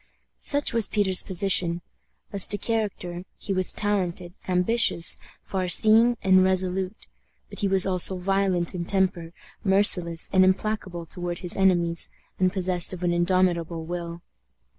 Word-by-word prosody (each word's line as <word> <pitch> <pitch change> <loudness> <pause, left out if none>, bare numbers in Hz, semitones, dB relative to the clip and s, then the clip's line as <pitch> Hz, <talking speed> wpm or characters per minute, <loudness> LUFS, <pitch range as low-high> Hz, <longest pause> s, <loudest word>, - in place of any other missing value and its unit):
Such 285 -2 +2
was 230 -2 +2
Peter's 195 -4 +2
position. 175 -2 0 0.5
As 200 -2 0
to 205 - +7
character, 200 -5 -4
he 195 - -5
was 185 -1 +2
talented, 180 -4 -2
ambitious, 180 -1 +2 0.2
far 185 -2 -4
seeing, 225 +6 +3
and 185 -1 +4
resolute; 185 +2 -1 0.5
but - - -9
he 200 - -1
was 190 -1 +3
also 185 0 +2
violent 190 -1 -1
in 175 -2 -4
temper, 180 -3 -2 0.3
merciless 185 -4 +3
and 185 -1 +5
implacable 185 -2 -2
toward 175 0 -6
his 175 - 0
enemies, 175 -3 +1 0.3
and 185 0 +1
possessed 185 -2 -1
of 180 -1 -8
an 175 -1 0
indomitable 175 -2 -1
will. 170 0 -7
185 Hz, 140 wpm, -24 LUFS, 175-195 Hz, 0.5 s, to